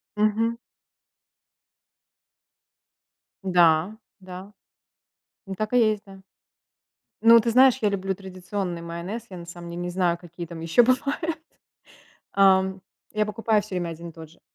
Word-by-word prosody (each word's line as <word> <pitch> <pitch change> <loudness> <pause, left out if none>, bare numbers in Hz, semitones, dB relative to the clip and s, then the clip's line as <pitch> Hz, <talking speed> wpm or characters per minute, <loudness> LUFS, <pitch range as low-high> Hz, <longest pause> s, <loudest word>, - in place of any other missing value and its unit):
Мгм. 215 +2 +1 2.9
Да 175 +1 +3 0.2
да, 185 +2 -10 1.0
так 215 +3 -3
и 250 - +4
есть, 210 -1 -6
да. 195 -1 -14 1.0
Ну, 230 0 +8
ты 230 +1 0
знаешь, 255 +2 +5
я 210 - +2
люблю 195 -1 -2
традиционный 185 -1 -5
майонез, 170 +7 -6
я 185 - -7
на 170 - -9
самом 175 0 -9
деле 170 +1 -5
не 175 - -3
знаю, 175 -1 +1
какие 170 0 -9
там 165 0 -9
ещё 165 +9 +4
бывают, 280 +6 0 1.0
ам, 190 -1 +3 0.3
я 215 0 +1
покупаю 210 0 0
всё 200 -3 -6
время 175 -1 -2
один 170 +1 -8
и - - -10
тот 160 -1 -11
же. 165 - -22
190 Hz, 135 wpm, -24 LUFS, 175-215 Hz, 2.9 s, Ну